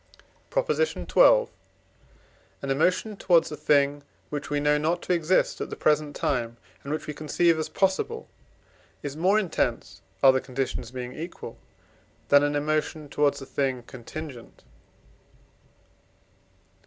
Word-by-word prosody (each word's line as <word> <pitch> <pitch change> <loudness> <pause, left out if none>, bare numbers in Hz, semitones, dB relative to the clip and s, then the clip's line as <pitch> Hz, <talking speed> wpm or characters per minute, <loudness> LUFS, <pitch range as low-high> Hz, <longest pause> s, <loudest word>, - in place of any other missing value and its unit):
PROP. - - 0
XII. 480 +1 -1 1.6
An 135 - -2
emotion 185 +9 +1
towards 170 -5 +3
a - - -4
thing, 145 -1 +2 0.3
which 145 -1 -4
we 145 0 0
know 150 0 +2
not 165 +3 0
to - - 0
exist 170 +1 +1
at - - -3
the - - -5
present 150 -1 +1
time, 120 -3 -1 0.3
and 140 - -6
which 155 - -3
we 150 - -5
conceive 160 +2 +1
as 155 - -3
possible, 195 - -1 0.8
is 145 -1 -5
more 185 +6 +3
intense, 200 -6 -1 0.2
other 130 -1 +7
conditions 130 -2 -4
being 125 0 -6
equal, 170 +3 -8 0.7
than 145 0 +7
an 145 0 0
emotion 155 0 -1
towards 145 -1 +1
a - - -9
thing 130 -3 -2
contingent. 130 +1 -9
150 Hz, 130 wpm, -26 LUFS, 140-165 Hz, 1.6 s, other